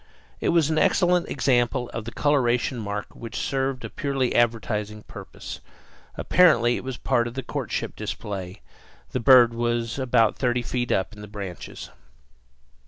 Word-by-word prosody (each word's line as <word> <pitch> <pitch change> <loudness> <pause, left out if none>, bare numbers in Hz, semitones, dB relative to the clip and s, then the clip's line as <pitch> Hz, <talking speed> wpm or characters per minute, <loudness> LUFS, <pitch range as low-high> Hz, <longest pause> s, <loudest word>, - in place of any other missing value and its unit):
It - - 0
was 165 -3 +3
an 155 - +2
excellent 180 -1 +2
example 120 -3 +1
of 110 -1 -6
a - - -4
coloration 125 -4 +1
mark 105 -1 -5
which 115 -1 -7
served 135 -1 -2
a - - -5
purely 135 -3 -1
advertising 110 -3 0
purpose; - - -9 0.6
apparently 120 -10 +4
it - - -5
was 130 -2 -5
part 120 0 +1
of 120 +2 -9
a 135 - -2
courtship - - -4
display. 95 -1 -6 0.5
The 130 - -1
bird 120 -1 +7
was 120 +1 -1
about 120 -4 +2
thirty 125 -1 0
feet 120 0 -2
up 95 +3 0
in 105 - -11
the 105 - -8
branches. 100 -4 -8
120 Hz, 155 wpm, -24 LUFS, 110-130 Hz, 0.6 s, bird